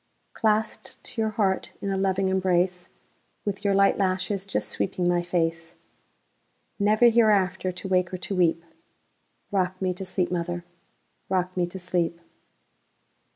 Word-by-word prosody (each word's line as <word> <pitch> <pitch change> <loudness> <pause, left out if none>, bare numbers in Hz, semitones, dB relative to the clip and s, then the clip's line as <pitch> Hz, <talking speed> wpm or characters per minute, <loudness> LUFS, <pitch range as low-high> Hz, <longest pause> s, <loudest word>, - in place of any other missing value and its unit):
Clasped 215 -1 0
to 225 - -4
your 220 - +1
heart 200 -4 0
in 200 - -3
a - - 0
loving 190 0 +1
embrace, 180 -1 +1 0.6
With 200 -1 -3
your 200 -1 +2
light 195 +1 +4
lashes 190 +1 -1
just 195 - -1
sweeping 180 -1 -1
my 175 0 +2
face, 165 -2 -2 1.0
Never 215 +4 +5
hereafter 200 -5 +3
to 180 +2 -7
wake 185 -1 +1
or 185 - -3
to 195 +2 -4
weep;—Rock 180 +2 -3
me 185 -1 0
to 185 - -6
sleep, 185 -1 -1
mother,—rock 175 +1 -5
me 180 -1 +1
to 175 - -8
sleep! 175 -2 -1
185 Hz, 135 wpm, -26 LUFS, 175-195 Hz, 1.0 s, Never